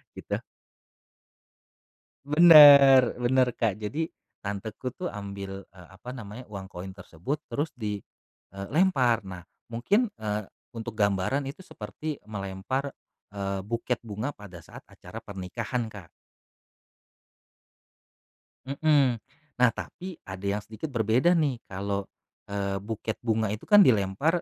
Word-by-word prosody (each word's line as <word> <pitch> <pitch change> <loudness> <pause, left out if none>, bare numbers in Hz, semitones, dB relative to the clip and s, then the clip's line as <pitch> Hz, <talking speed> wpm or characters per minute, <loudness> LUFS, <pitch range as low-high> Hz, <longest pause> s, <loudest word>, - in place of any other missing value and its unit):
gitu. - - -4 1.8
Bener, 145 -4 +9
bener 130 +1 +3
Kak 110 -5 0
jadi 145 +10 -3 0.3
tanteku 105 +5 -5
tuh 180 - -4
ambi,l 100 -1 -7
eee, 90 -2 -16
apa 110 +6 -10
namanya 110 0 -8
uang 100 -2 -7
koin 90 +2 -7
tersebut 95 - -5
terus 150 +2 -1
di, 105 -3 -3 0.6
eee, 100 0 -6
lempar. 135 -10 +3
Nah 90 -2 -8 0.3
mungkin, 200 - +1
eee, 105 -1 -3 0.3
untuk 115 -1 -6
gambaran 100 +7 +1
itu 140 - -10
seperti 155 -2 -6
melempar, 105 +7 -4 0.4
eee, 100 -1 -3
buket 115 +2 -2
bunga 110 +4 -4
pada 100 -4 -12
saat - - -12
acara - - -10
pernikahan, 110 +5 -4
Kak. 100 -5 -11 2.6
Mhm, 140 -4 +2 0.4
nah 125 -1 +6
tapi 175 - -8
ada 95 +1 -7
yang 100 +1 0
sedikit 110 +8 -7
berbeda 120 - +3
nih 140 -7 0
kalau, 100 +1 -3 0.4
eee, 100 -1 -2
buket 110 +1 -4
bunga 110 -3 0
itu 105 - -8
kan 205 -1 +8
dilempar 120 - +2
110 Hz, 120 wpm, -27 LUFS, 100-135 Hz, 2.6 s, Bener